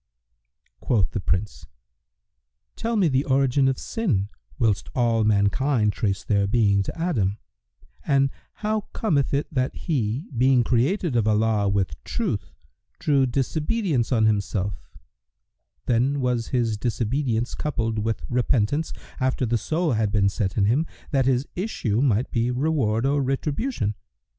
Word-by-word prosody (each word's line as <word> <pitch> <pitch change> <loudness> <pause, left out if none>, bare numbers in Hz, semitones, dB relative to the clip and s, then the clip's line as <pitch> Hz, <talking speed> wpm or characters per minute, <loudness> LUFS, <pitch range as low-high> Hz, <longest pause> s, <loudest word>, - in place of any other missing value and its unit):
Quoth 105 -8 +1
the - - -2
Prince, 95 +2 -2 1.1
"Tell 230 +1 -2
me 195 -5 +3
the 135 -2 +2
origin 135 0 +3
of 135 -1 +1
sin, 120 - -1 0.3
whilst 110 -5 +1
all 115 -3 +2
mankind 105 +2 +2
trace 100 -2 -1
their 100 -2 +1
being 100 -2 +3
to 100 - -5
Adam, 110 - 0 0.7
and 140 -1 +2 0.3
how 215 -1 -1
cometh 150 -11 +1
it 140 +1 +1
that 130 -2 0
he, 130 - -2
being 125 +1 +4
created 135 - +1
of 110 -2 +2
Allah 105 -1 +2
with 95 -10 -1
truth, - - -3 0.5
drew 140 -3 +2
disobedience 150 - 0
on 110 -3 +3
himself; 100 -2 -1 1.0
then 130 +4 +1
was 125 -3 0
his 115 -4 0
disobedience 120 +2 -1
coupled 115 -7 -2
with 110 +1 -2
repentance, 125 +4 +1 0.3
after 130 -1 0
the 120 0 0
soul 160 +7 0
had 110 -3 +1
been 100 -2 +3
set 100 -1 -2
in 100 - +3
him, 135 +10 +2 0.2
that 135 -3 +2
his 130 +1 +1
issue 130 - -1
might 125 -3 +1
be 115 0 +1
reward 125 -4 0
or 140 +1 +2
retribution? 140 - -1
120 Hz, 140 wpm, -24 LUFS, 105-140 Hz, 1.1 s, being